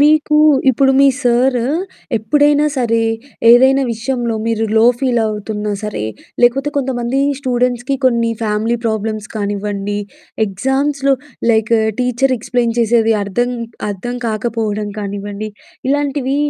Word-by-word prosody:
మీకు 300 Hz, +1 st, +4 dB, 0.3 s
ఇప్పుడు 270 Hz, +2 st, +3 dB
మీ 275 Hz, -, +6 dB
సారు 245 Hz, 0 st, +2 dB, 0.5 s
ఎప్పుడైనా 290 Hz, +6 st, +3 dB
సరే, 230 Hz, -3 st, +1 dB, 0.5 s
ఏదైనా 265 Hz, +3 st, +6 dB
విషయంలో 240 Hz, 0 st, -2 dB
మీరు 225 Hz, -1 st, 0 dB
లో 220 Hz, -, +5 dB, 0.2 s
ఫీల్ 250 Hz, -3 st, +1 dB
అవుతున్నా 210 Hz, 0 st, -3 dB
సరే, 210 Hz, -, -4 dB, 0.4 s
లేకపోతే 270 Hz, +4 st, +3 dB
కొంతమంది 255 Hz, -1 st, -1 dB, 0.2 s
స్టూడెంట్స్‌కి 250 Hz, 0 st, 0 dB
కొన్ని 235 Hz, -2 st, +2 dB
ఫ్యామిలీ 220 Hz, +2 st, 0 dB
ప్రాబ్లమ్స్ 215 Hz, -1 st, -2 dB
కానివ్వండి, 205 Hz, 0 st, -3 dB, 0.5 s
ఎగ్జామ్స్‌లో 270 Hz, +7 st, 0 dB, 0.4 s
లైక్ 220 Hz, 0 st, +1 dB, 0.3 s
టీచర్ 250 Hz, +1 st, +1 dB
ఎక్స్ప్లెయిన్ 235 Hz, 0 st, -1 dB
చేసేది 225 Hz, -1 st, +3 dB
అర్థం 220 Hz, +5 st, -1 dB, 0.4 s
అర్థం 210 Hz, +5 st, -4 dB
కాకపోవడం 215 Hz, -2 st, -2 dB
కానివ్వండి. 205 Hz, +1 st, -5 dB, 0.4 s
ఇలాంటివి 280 Hz, -1 st, 0 dB
235 Hz, 110 wpm, -16 LUFS, 215-265 Hz, 0.5 s, మీ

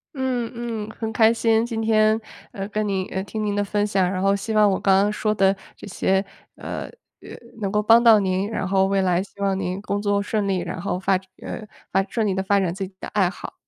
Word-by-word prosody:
嗯 255 Hz, -3 st, -1 dB
嗯。 230 Hz, -3 st, -4 dB
很 220 Hz, 0 st, -5 dB
开 225 Hz, 0 st, +5 dB
心 225 Hz, 0 st, +2 dB
今 230 Hz, -2 st, -3 dB
天， 220 Hz, 0 st, +3 dB, 0.3 s
呃， 195 Hz, 0 st, -5 dB
跟 210 Hz, +1 st, -2 dB
你 190 Hz, -2 st, -1 dB
呃， 190 Hz, 0 st, -3 dB
听 215 Hz, +1 st, -4 dB
您 205 Hz, -1 st, -1 dB
的 205 Hz, -, +1 dB
分 205 Hz, +1 st, 0 dB
享。 190 Hz, -3 st, +1 dB
然 185 Hz, -, -2 dB
后 195 Hz, +1 st, +3 dB
希 210 Hz, +3 st, -4 dB
望 210 Hz, -1 st, +5 dB
我 190 Hz, -, 0 dB
刚 195 Hz, -1 st, +4 dB
刚 210 Hz, -, +1 dB
说 215 Hz, 0 st, 0 dB
的 195 Hz, -1 st, +3 dB, 0.2 s
这 -, -, -11 dB
些， 190 Hz, 0 st, +1 dB, 0.3 s
呃 -, -, -5 dB, 0.4 s
呃， -, -, -12 dB, 0.3 s
能 195 Hz, -, -1 dB
够 210 Hz, 0 st, +2 dB
帮 230 Hz, +2 st, +6 dB
到 225 Hz, -3 st, +7 dB
您， 190 Hz, +1 st, 0 dB
然 200 Hz, -4 st, -2 dB
后 190 Hz, 0 st, +3 dB
未 195 Hz, 0 st, +1 dB
来 180 Hz, 0 st, +1 dB
希 200 Hz, -, -18 dB
望 195 Hz, -1 st, +1 dB
您 185 Hz, 0 st, -3 dB
工 205 Hz, 0 st, -2 dB
作 205 Hz, -1 st, +1 dB
顺 205 Hz, 0 st, -1 dB
利， 190 Hz, -2 st, +1 dB
然 175 Hz, 0 st, -5 dB
后 180 Hz, 0 st, -2 dB
发 195 Hz, -, +1 dB, 0.3 s
呃， 215 Hz, -, -6 dB, 0.3 s
发 195 Hz, -, +2 dB
顺 225 Hz, -3 st, 0 dB
利 195 Hz, -, +1 dB
地 190 Hz, 0 st, -1 dB
发 200 Hz, +1 st, +2 dB
展 175 Hz, -3 st, 0 dB
自 195 Hz, 0 st, -4 dB
己 190 Hz, -, -19 dB
的 -, -, -6 dB
爱 195 Hz, -4 st, +2 dB
好。 -, -, -9 dB
200 Hz, 265 characters per minute, -23 LUFS, 190-215 Hz, 0.4 s, 到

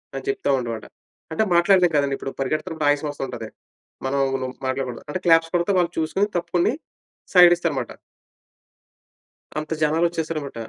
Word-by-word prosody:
అని -, -, -5 dB
చెప్తానమాట. 125 Hz, -, -1 dB, 0.5 s
అంటే 160 Hz, +7 st, +1 dB
మాట్లాడలేం 180 Hz, 0 st, +5 dB
కదండీ, 140 Hz, -1 st, +2 dB
ఇప్పుడు 135 Hz, -, -6 dB
పరిగెడుతున్నప్పుడు 155 Hz, +3 st, -1 dB
ఆయాసం 145 Hz, +1 st, +1 dB
వస్తు 145 Hz, -, -6 dB
ఉంటది. 115 Hz, -3 st, -7 dB, 0.6 s
మనం 140 Hz, +1 st, 0 dB, 0.5 s
మాట్లాడకూడదు. 130 Hz, -2 st, -3 dB
అంటే 165 Hz, -, -2 dB
క్లాప్స్ 165 Hz, 0 st, +5 dB
కొడితే 175 Hz, +3 st, +1 dB
వాళ్ళు 175 Hz, -1 st, +1 dB
చూసుకొని 165 Hz, +6 st, 0 dB
తప్పుకుని 175 Hz, +4 st, +1 dB, 0.6 s
సైడ్ 175 Hz, -1 st, +9 dB
ఇస్తారనమాట. 170 Hz, -6 st, -2 dB, 1.7 s
అంత 155 Hz, +1 st, -8 dB
జనాలు 155 Hz, +2 st, +2 dB
వచ్చేశారనమాట. 155 Hz, -5 st, -4 dB
155 Hz, 130 wpm, -23 LUFS, 140-175 Hz, 1.7 s, సైడ్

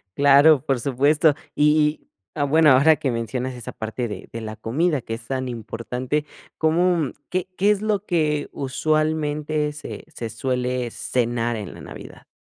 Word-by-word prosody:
Claro, 140 Hz, 0 st, +6 dB
por 135 Hz, -3 st, +1 dB
supuesto. 145 Hz, +4 st, +3 dB, 0.2 s
Y 150 Hz, -, +3 dB
y, 150 Hz, 0 st, +2 dB, 0.3 s
ah, 145 Hz, -, 0 dB
bueno, 150 Hz, +1 st, +5 dB
ahora 145 Hz, +5 st, +6 dB
que 135 Hz, -, -1 dB
mencionas 125 Hz, +2 st, -3 dB
esa 120 Hz, -, -7 dB
parte 115 Hz, +2 st, -4 dB
de 105 Hz, -, -8 dB
de 115 Hz, -, -6 dB
la 110 Hz, 0 st, -6 dB
comida 140 Hz, +7 st, 0 dB
que 115 Hz, -, -6 dB
es 115 Hz, 0 st, -6 dB
tan 130 Hz, -1 st, -2 dB
importante, 125 Hz, +5 st, -3 dB, 0.3 s
¿cómo 165 Hz, -1 st, +2 dB, 0.2 s
qué 185 Hz, 0 st, -2 dB
qué 205 Hz, +2 st, +4 dB
es 205 Hz, 0 st, 0 dB
lo 210 Hz, -1 st, -1 dB
que 150 Hz, -4 st, 0 dB
usualmente 150 Hz, +1 st, -1 dB
se 150 Hz, -, -8 dB
se 115 Hz, -1 st, -5 dB
suele 125 Hz, 0 st, -2 dB
cenar 120 Hz, -1 st, -1 dB
en 105 Hz, -4 st, -6 dB
la -, -, -11 dB
Navidad? -, -, -11 dB
140 Hz, 165 wpm, -23 LUFS, 120-155 Hz, 0.3 s, Claro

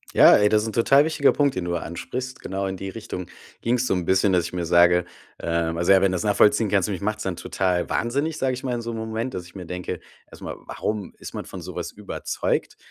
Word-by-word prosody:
Ja, -, -, +9 dB
ey, 105 Hz, -, +4 dB
das 105 Hz, 0 st, +3 dB
is'n 110 Hz, -, -4 dB
total 135 Hz, +5 st, +5 dB
wichtiger 150 Hz, -3 st, +3 dB
Punkt, 145 Hz, -2 st, +2 dB
den 95 Hz, -, -2 dB
du 90 Hz, -, -2 dB
da 85 Hz, -, 0 dB
ansprichst. 130 Hz, +9 st, -5 dB
Genau 95 Hz, +1 st, -3 dB
in 95 Hz, -, -4 dB
die 95 Hz, +1 st, -5 dB
Richtung 90 Hz, -4 st, -7 dB, 0.3 s
ging's 125 Hz, +2 st, +1 dB
so -, -, +2 dB
'n 90 Hz, -2 st, -2 dB
bisschen, 95 Hz, +1 st, +3 dB
dass 90 Hz, -2 st, +3 dB
ich 85 Hz, -, -7 dB
mir 90 Hz, -1 st, -2 dB
sage, 90 Hz, 0 st, +5 dB, 0.3 s
ähm 85 Hz, 0 st, -1 dB
also 85 Hz, +3 st, +2 dB
ja, 95 Hz, -1 st, +7 dB
wenn 95 Hz, -, +3 dB
du -, -, -1 dB
das 90 Hz, -, -2 dB
nachvollziehen 105 Hz, +1 st, +4 dB
kannst 100 Hz, 0 st, +2 dB
mich 100 Hz, -3 st, -4 dB
macht's 105 Hz, +1 st, -2 dB
dann 95 Hz, -2 st, -2 dB
total 90 Hz, 0 st, -1 dB
wahnsinnig, 140 Hz, +7 st, -1 dB
sag 130 Hz, -1 st, 0 dB
ich 125 Hz, -, -5 dB
mal, 125 Hz, -2 st, -1 dB
in 120 Hz, -, -3 dB
so 115 Hz, -, -4 dB
'nem 110 Hz, -, -4 dB
Moment, 115 Hz, +3 st, -3 dB
dass 90 Hz, -2 st, -5 dB
ich 90 Hz, -, -19 dB
mir 90 Hz, -, -7 dB
denke, 90 Hz, 0 st, -5 dB, 0.3 s
erst -, -, -13 dB
mal: -, -, -5 dB
„Warum 105 Hz, -3 st, -4 dB
ist -, -, -9 dB
man -, -, -5 dB
von -, -, -8 dB
so -, -, -8 dB
was -, -, -4 dB
überzeugt?“ -, -, -3 dB
100 Hz, 260 wpm, -24 LUFS, 90-115 Hz, 0.3 s, Ja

